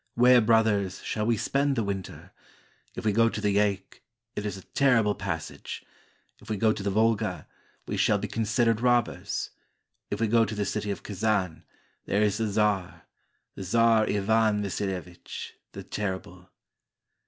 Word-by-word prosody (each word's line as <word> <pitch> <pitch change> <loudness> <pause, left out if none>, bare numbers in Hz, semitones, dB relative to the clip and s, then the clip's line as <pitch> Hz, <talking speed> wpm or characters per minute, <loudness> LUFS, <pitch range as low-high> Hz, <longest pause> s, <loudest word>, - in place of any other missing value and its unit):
Where, 125 +1 +6
brothers, 110 -4 +2
shall 105 0 -2
we 115 -1 +2
spend 140 +5 +1
the 115 - 0
winter? 100 -2 -5 0.6
If - - -6
we 105 - +3
go 115 +2 +4
to 110 - -4
the 105 -1 +1
Yaik, 100 -2 0 0.3
it 105 - -3
is 100 -2 -4
a 95 - -11
terrible 120 -7 +2
passage; 90 -5 -5 0.5
If - - -15
we 110 - -1
go 110 +2 +3
to - - -6
the 100 - -1
Volga, 110 -2 +1 0.4
we - - -3
shall - - +3
be - - -4
considered 115 0 +1
robbers; 120 -2 0 0.6
If 100 - -3
we 115 - +2
go 115 +1 +4
to 110 0 -3
the 105 -1 -1
city 105 +1 -3
of 100 - -4
Kazan, 100 -4 -1 0.4
there 100 +2 +1
is 105 0 +1
the 110 - 0
czar 105 -3 0 0.3
— - - -48
The - - -6
Czar 115 +2 +3
Ivan 105 +1 +2
Vasilevich, 95 -3 -5 0.2
the - - -7
Terrible. 95 -3 -5
105 Hz, 165 wpm, -27 LUFS, 100-115 Hz, 0.6 s, Where